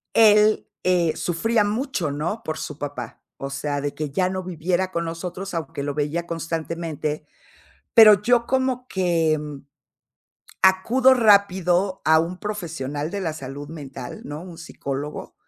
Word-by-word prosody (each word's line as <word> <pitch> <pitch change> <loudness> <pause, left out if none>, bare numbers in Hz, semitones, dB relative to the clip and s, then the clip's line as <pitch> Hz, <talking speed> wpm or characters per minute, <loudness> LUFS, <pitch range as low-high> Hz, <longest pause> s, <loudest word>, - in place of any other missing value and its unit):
él, 215 -1 +5 0.2
eh, 175 -3 +2
sufría 210 +6 +1
mucho, 210 - -1
¿no?, 165 +10 -3
por 155 - -4
su 150 - -6
papá. 140 -6 -6 0.2
O 135 0 -5
sea, 145 0 -2
de 145 0 -3
que 150 -2 -4
ya 180 +6 +1
no 185 0 -3
viviera 180 +2 -1
con 170 -1 -2
nosotros, 180 +3 -5
aunque 160 -3 -4
lo 145 0 -2
veía 150 +4 -2
constantemente. 165 -2 -4 0.7
Pero 215 -3 +9
yo 235 +1 +3
como 260 -1 0
que, 165 -4 +1
mm, 145 -2 -8 1.0
acudo 230 +8 +5
rápido 195 -4 +3
a 160 0 +5
un 175 +3 -4
profesional 160 -8 -4
de 200 - -3
la 165 -4 -2
salud 145 -1 -8
mental, 140 -6 -8
¿no?, 150 +3 -6
un 175 -3 -10
psicólogo, 145 -3 -6
170 Hz, 145 wpm, -23 LUFS, 150-200 Hz, 1.0 s, Pero